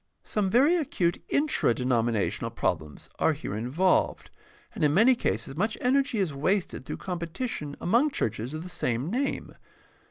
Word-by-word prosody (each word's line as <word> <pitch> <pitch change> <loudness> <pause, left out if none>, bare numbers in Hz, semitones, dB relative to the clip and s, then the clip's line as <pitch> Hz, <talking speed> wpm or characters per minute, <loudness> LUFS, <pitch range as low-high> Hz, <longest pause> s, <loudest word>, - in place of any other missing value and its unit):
Some 205 -3 -1
very 275 - +5
acute 180 - 0
intradenominational 120 - +1
problems 75 -2 -2
are 160 - +3
here 140 -8 -5
involved, 140 - +1 0.4
and - - -3
in 150 0 +3
many 230 +7 +6
cases 135 - -2
much 215 +7 -1
energy 265 -1 +2
is 185 -7 0
wasted 155 -1 -1
through - - -4
competition 170 - -4
among 240 - +3
churches 120 - -2
of 155 - -5
the - - -7
same 130 -1 -2
name. 270 +4 -2
175 Hz, 145 wpm, -27 LUFS, -, 0.4 s, many